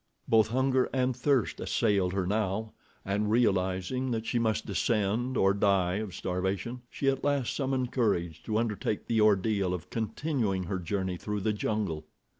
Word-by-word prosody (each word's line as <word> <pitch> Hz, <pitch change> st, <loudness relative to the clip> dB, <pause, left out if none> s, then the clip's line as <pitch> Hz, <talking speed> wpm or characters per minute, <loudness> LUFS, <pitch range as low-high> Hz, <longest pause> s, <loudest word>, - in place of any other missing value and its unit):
Both 110 Hz, -1 st, +5 dB
hunger 130 Hz, +2 st, +2 dB
and 130 Hz, -1 st, +1 dB
thirst 130 Hz, -2 st, +1 dB
assailed 100 Hz, -5 st, +1 dB
her 95 Hz, -2 st, 0 dB
now, 105 Hz, +2 st, -1 dB, 0.3 s
and 105 Hz, +2 st, 0 dB
realizing 100 Hz, +2 st, +1 dB
that 115 Hz, -2 st, -2 dB
she 120 Hz, -, 0 dB
must 110 Hz, -2 st, 0 dB
descend 110 Hz, +4 st, 0 dB
or 95 Hz, 0 st, +4 dB
die 100 Hz, -2 st, +2 dB
of 105 Hz, -4 st, -5 dB
starvation, 95 Hz, +7 st, -2 dB
she 140 Hz, -, -3 dB
at 135 Hz, -1 st, +1 dB
last 140 Hz, -4 st, 0 dB
summoned 130 Hz, -3 st, -1 dB
courage 90 Hz, -, 0 dB
to 110 Hz, -1 st, 0 dB
undertake 110 Hz, -2 st, -1 dB
the 115 Hz, -2 st, +1 dB
ordeal 100 Hz, -2 st, +3 dB
of 85 Hz, -, -9 dB
continuing 110 Hz, -4 st, -1 dB
her 95 Hz, +1 st, -3 dB
journey 95 Hz, 0 st, -2 dB
through 105 Hz, +2 st, -3 dB
the 105 Hz, +2 st, +1 dB
jungle. 100 Hz, -7 st, -2 dB
105 Hz, 160 wpm, -29 LUFS, 95-120 Hz, 0.3 s, Both